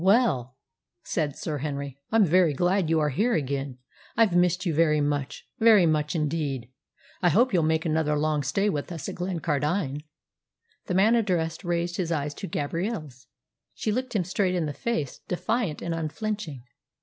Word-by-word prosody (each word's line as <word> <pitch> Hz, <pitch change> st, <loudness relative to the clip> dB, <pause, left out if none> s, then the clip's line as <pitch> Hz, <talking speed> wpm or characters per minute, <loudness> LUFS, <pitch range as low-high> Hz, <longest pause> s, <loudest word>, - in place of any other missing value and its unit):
"Well," 180 Hz, -, +2 dB, 0.5 s
said 150 Hz, -4 st, -1 dB
Sir 150 Hz, -3 st, -4 dB
Henry, 140 Hz, -1 st, -4 dB
"I'm 220 Hz, -2 st, +5 dB
very 170 Hz, -3 st, +3 dB
glad 175 Hz, +2 st, +1 dB
you 160 Hz, -1 st, +3 dB
are 150 Hz, -1 st, +1 dB
here 225 Hz, -, +1 dB
again. 140 Hz, -2 st, -2 dB, 0.4 s
I've 220 Hz, -6 st, +4 dB
missed 180 Hz, +1 st, +2 dB
you 170 Hz, -, +1 dB
very 155 Hz, -1 st, +3 dB
much 145 Hz, -2 st, -2 dB
very 220 Hz, -5 st, +6 dB
much 155 Hz, 0 st, +1 dB
indeed. 145 Hz, -6 st, -2 dB, 0.5 s
I 175 Hz, -, +4 dB
hope 235 Hz, -, +3 dB
you'll 175 Hz, -, +4 dB
make 160 Hz, +1 st, +1 dB
another 155 Hz, -2 st, +1 dB
long 150 Hz, 0 st, +1 dB
stay 150 Hz, +10 st, 0 dB
with 150 Hz, -4 st, -2 dB
us 165 Hz, -4 st, -5 dB
at -, -, -4 dB
Glencardine." 160 Hz, -4 st, -1 dB, 0.9 s
The 180 Hz, -, -1 dB
man 205 Hz, +5 st, +5 dB
addressed 180 Hz, -7 st, 0 dB
raised 175 Hz, 0 st, -1 dB
his 175 Hz, -3 st, -1 dB
eyes 145 Hz, -2 st, -1 dB
to -, -, -6 dB
Gabrielle's. 155 Hz, -, -4 dB, 0.5 s
She 215 Hz, -, -1 dB
looked 255 Hz, +2 st, -2 dB
him 195 Hz, -, +2 dB
straight 185 Hz, +1 st, 0 dB
in 170 Hz, -3 st, 0 dB
the 145 Hz, -, -3 dB
face, 155 Hz, -, -3 dB
defiant 185 Hz, -2 st, -1 dB
and 170 Hz, -, -2 dB
unflinching. 165 Hz, -, -4 dB
165 Hz, 170 wpm, -26 LUFS, 145-190 Hz, 0.9 s, very